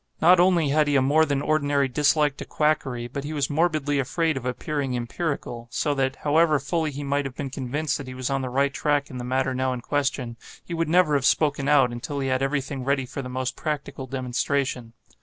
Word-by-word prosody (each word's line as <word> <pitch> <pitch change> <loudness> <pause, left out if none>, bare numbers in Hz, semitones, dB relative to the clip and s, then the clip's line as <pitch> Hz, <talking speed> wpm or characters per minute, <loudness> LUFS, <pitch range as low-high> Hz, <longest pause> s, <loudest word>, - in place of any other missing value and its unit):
Not 175 +2 +6
only 175 -4 +4
had 150 +1 +3
he 145 - +2
a 135 - +5
more 155 +4 +4
than 140 -1 0
ordinary 145 -2 +2
dislike 145 +2 +2
to - - -6
quackery, 135 -6 0
but 135 +3 -5
he 150 +2 -5
was 145 -1 -1
morbidly 150 -2 +1
afraid 160 +4 0
of 130 -1 -4
appearing 135 +1 -2
empirical; 120 -2 -4
so 145 +4 0
that, 135 -1 0
however 155 +1 +4
fully 155 +4 -1
he 145 0 -6
might 140 +1 0
have 135 -2 -6
been 140 -2 -5
convinced 140 +3 -2
that 140 - -7
he 130 - -7
was 130 +1 -3
on 135 0 0
the 130 - -3
right 135 +2 +1
track 145 0 0
in 125 - -6
the - - -5
matter 130 +1 0
now 130 0 0
in 125 - -5
question, 130 -4 -2 0.3
he 170 - -6
would 165 -2 -1
never 170 -2 +4
have 140 -2 +2
spoken 145 -3 +1
out, 140 -4 +4
until 120 +4 -5
he 135 -1 -1
had 130 0 +1
every 140 +1 +1
thing 135 -1 -6
ready 135 0 0
for 140 +2 -6
the 125 - -7
most 130 0 -3
practical 140 -3 -4
demonstration. 130 -1 -2
140 Hz, 230 wpm, -25 LUFS, 130-150 Hz, 0.3 s, Not